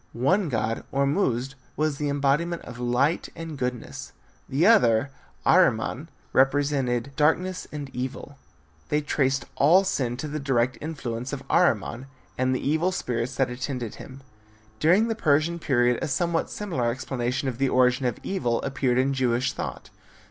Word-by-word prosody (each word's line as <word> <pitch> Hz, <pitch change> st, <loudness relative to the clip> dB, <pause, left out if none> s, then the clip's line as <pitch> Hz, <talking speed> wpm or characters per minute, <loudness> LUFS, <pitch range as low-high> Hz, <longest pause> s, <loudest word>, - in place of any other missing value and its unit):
One 165 Hz, -, +1 dB
god, 115 Hz, -2 st, -1 dB
Ormuzd, 135 Hz, -, 0 dB, 0.2 s
was 155 Hz, -2 st, -1 dB
the 145 Hz, -1 st, -1 dB
embodiment 145 Hz, +5 st, 0 dB
of 120 Hz, 0 st, -10 dB
light 125 Hz, +7 st, +1 dB
and 165 Hz, -2 st, -6 dB
goodness. 125 Hz, -3 st, -5 dB, 0.4 s
The 145 Hz, +6 st, +2 dB
other, 140 Hz, -, +4 dB, 0.3 s
Ahriman, -, -, +3 dB, 0.2 s
represented 135 Hz, -2 st, +2 dB
darkness 175 Hz, +5 st, +1 dB
and 145 Hz, -2 st, -5 dB
evil. 130 Hz, +2 st, -6 dB, 0.5 s
They 150 Hz, 0 st, +1 dB
traced 135 Hz, -3 st, 0 dB
all 170 Hz, +7 st, +6 dB
sin 130 Hz, -11 st, -1 dB
to 150 Hz, -, -4 dB
the 150 Hz, +1 st, -4 dB
direct 130 Hz, -3 st, +1 dB
influence 130 Hz, -5 st, -4 dB
of 135 Hz, -1 st, -5 dB
Ahriman 130 Hz, -, +1 dB, 0.3 s
and 130 Hz, 0 st, +1 dB
the -, -, -3 dB
evil 160 Hz, +5 st, +2 dB
spirits 125 Hz, -7 st, -2 dB
that 125 Hz, 0 st, +1 dB
attended 125 Hz, -2 st, -4 dB
him. 135 Hz, 0 st, -11 dB, 0.6 s
During 185 Hz, +8 st, +4 dB
the 225 Hz, -, 0 dB
Persian 160 Hz, -3 st, +1 dB
period 120 Hz, -5 st, +2 dB
a -, -, -1 dB
somewhat 165 Hz, +4 st, 0 dB
similar 165 Hz, -, -2 dB
explanation 130 Hz, +1 st, -2 dB
of 125 Hz, -2 st, -3 dB
the 135 Hz, -1 st, +2 dB
origin 125 Hz, 0 st, +3 dB
of 120 Hz, -, -2 dB
evil 125 Hz, -12 st, -1 dB
appeared 130 Hz, -2 st, 0 dB
in 135 Hz, +2 st, +2 dB
Jewish 130 Hz, -1 st, +1 dB
thought. -, -, -6 dB
135 Hz, 150 wpm, -25 LUFS, 125-155 Hz, 0.6 s, all